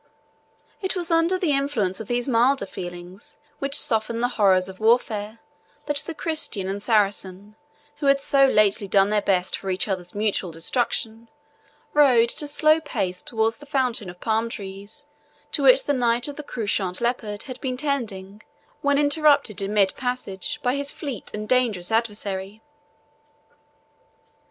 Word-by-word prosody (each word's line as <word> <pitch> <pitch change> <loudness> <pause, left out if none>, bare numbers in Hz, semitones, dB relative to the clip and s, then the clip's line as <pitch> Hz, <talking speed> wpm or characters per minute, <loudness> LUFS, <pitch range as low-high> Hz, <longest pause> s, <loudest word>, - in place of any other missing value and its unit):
It 380 0 -1
was 350 -1 -3
under 330 +3 +3
the 355 -5 0
influence 275 -10 0
of 220 - -7
these 245 +1 -1
milder 250 -1 +3
feelings 180 +2 -9 0.2
which 275 0 +3
soften 225 0 0
the 245 +1 +1
horrors 190 -6 +3
of 190 0 -10
warfare 220 -1 +1 0.5
that 295 -1 -1
the 325 +3 -3
Christian 300 - -1
and 195 +1 -3
Saracen, 205 -2 0 0.4
who 290 -1 -2
had 275 0 +5
so 275 0 +4
lately 210 -3 +2
done 195 +1 +3
their 210 -1 +2
best 185 -2 +1
for 195 - -6
each 185 +3 -1
other's 185 -2 -4
mutual 205 -3 0
destruction, 225 +6 -2 0.6
rode 250 -6 +5
at - - -3
a 295 - -4
slow 310 +2 +3
pace 185 - -3
towards 225 0 -1
the 290 - -13
fountain 250 -8 0
of 180 0 -11
palm 225 +1 0
trees 200 +6 -8 0.5
to - - +2
which - - +6
the 290 - 0
Knight 240 -1 +1
of 290 - -6
the 300 - -6
Couchant 200 -8 -2
Leopard 230 -3 -2
had 255 -3 -9
been 255 -2 -3
tending, 215 -8 -3 0.4
when 285 0 +2
interrupted 290 - +3
in 195 +1 -2
mid 200 -2 +2
passage 250 +1 -4
by 250 -1 +2
his 280 0 -1
fleet 275 -8 -6
and 210 0 -5
dangerous 225 -8 +1
adversary. 210 -2 -2
225 Hz, 160 wpm, -24 LUFS, 200-275 Hz, 0.6 s, which